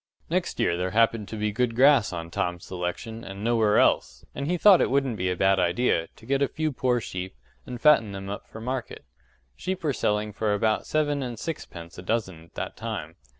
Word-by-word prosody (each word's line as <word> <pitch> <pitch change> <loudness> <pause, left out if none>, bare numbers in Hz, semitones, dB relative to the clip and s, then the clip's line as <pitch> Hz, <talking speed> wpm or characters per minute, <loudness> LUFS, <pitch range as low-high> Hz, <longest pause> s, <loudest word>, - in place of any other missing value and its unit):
Next 175 0 -1
year 85 - +2
there 90 +1 -1
happened 115 0 +2
to 110 - -6
be 105 0 0
good 115 +1 0
grass 135 -3 +5
on 85 -1 -6
Tom's 90 0 -2
selection 95 +6 -5
and 95 +1 -8
nowhere 110 -2 +3
else, - - +2
and 140 - -4
he 180 +2 +1
thought 195 +1 +7
it - - +2
wouldn't 135 -3 +1
be 90 -2 -1
a 90 - 0
bad 95 +1 +3
idea 90 0 +1
to 110 - -16
get 135 +3 0
a 140 - +4
few 155 +2 -2
poor 125 -2 +1
sheep, 90 - -6 0.3
and 125 -1 -6
fatten 125 -7 +5
them 95 0 -6
up 100 +1 -6
for 110 - -10
market: 125 +2 -5 0.5
sheep 185 - -4
were 150 -3 +1
selling 105 -2 0
for 105 0 0
about 110 +1 0
seven 145 -2 +1
and 120 -3 -4
sixpence 85 - -7
a - - -6
dozen 95 -5 -2
at 85 - -27
that - - -4
time. - - -5
110 Hz, 215 wpm, -26 LUFS, 95-130 Hz, 0.5 s, thought